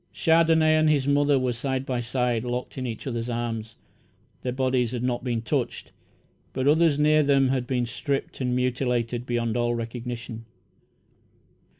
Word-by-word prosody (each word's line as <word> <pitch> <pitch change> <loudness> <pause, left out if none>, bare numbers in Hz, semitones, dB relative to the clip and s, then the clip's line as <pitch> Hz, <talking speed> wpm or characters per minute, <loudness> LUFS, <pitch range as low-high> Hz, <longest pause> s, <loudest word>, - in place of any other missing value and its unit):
Chandonnais 160 -1 +4
and 155 0 +3
his 140 -3 +2
mother 145 0 +3
were 130 -1 0
side 130 +2 -2
by 125 -2 -2
side, 120 -1 -1
locked 125 0 -4
in 130 -1 -3
each 115 -2 -6
other's 120 -2 -3
arms. 115 -2 -3 0.7
Their 125 - -2
bodies 130 -2 0
had 120 -1 -3
not 125 -1 -1
been 120 -3 -2
touched, 130 0 -2 0.6
but 130 +1 -1
others 155 0 +4
near 155 +1 +4
them 140 -2 +3
had 130 -2 -1
been 125 -2 0
stripped 135 +4 -3
and 125 -1 0
mutilated 125 -1 -1
beyond 120 -2 -1
all 120 0 +1
recognition. 115 0 -6
125 Hz, 160 wpm, -25 LUFS, 120-140 Hz, 0.7 s, Chandonnais